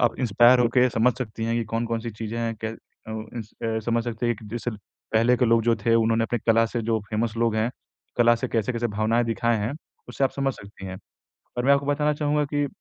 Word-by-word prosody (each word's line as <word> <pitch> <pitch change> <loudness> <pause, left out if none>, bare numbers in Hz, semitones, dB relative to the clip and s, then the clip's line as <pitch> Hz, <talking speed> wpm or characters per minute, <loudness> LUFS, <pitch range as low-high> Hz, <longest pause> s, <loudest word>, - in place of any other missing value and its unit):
आप 120 - +3
इंस्पायर 120 +2 +5
हो 120 - +4
के 125 0 +6
समझ 115 +2 +3
सकती 110 -3 -4
हैं 115 +1 0
कि 115 - 0
कौन-कौन 115 +1 -2
सी 115 0 -5
चीज़ें 110 +2 -5
हैं। 115 -1 -1
कै - - 0
अ 110 0 -11 0.3
उस 110 -1 -8
अ, 115 -1 0
समझ 115 +1 0
सकते 120 0 -2
हैं 120 - +3
एक 110 - -11
जैसे 120 +1 -3
ल 110 - -7 0.4
पहले 115 +3 +4
के 125 - +2
लोग 115 -1 +4
जो 115 -1 +3
थे, 115 +2 +1
उन्होंने 115 0 +3
अपनी 120 +1 -1
कला 115 0 +5
से 120 +1 -3
जो 110 0 +1
फेमस 110 +1 -1
लोग 115 -1 +1
हैं, 110 +3 +1 0.5
कला 120 -1 +5
से 115 - -3
कैसे-कैसे 115 +1 0
भावनाएँ 115 +2 +2
दिखाए 115 +1 +1
हैं, 110 +6 -2 0.4
उससे 135 - 0
आप - - +2
समझ 135 -1 -1
सकती 100 -1 -11
हैं। 95 0 -6 0.6
और 120 - 0
मैं 140 - +5
आपको 140 0 +1
बताना 150 +1 +1
चाहूँगा 150 0 +1
कि 145 0 +1
115 Hz, 245 wpm, -25 LUFS, 110-120 Hz, 0.6 s, के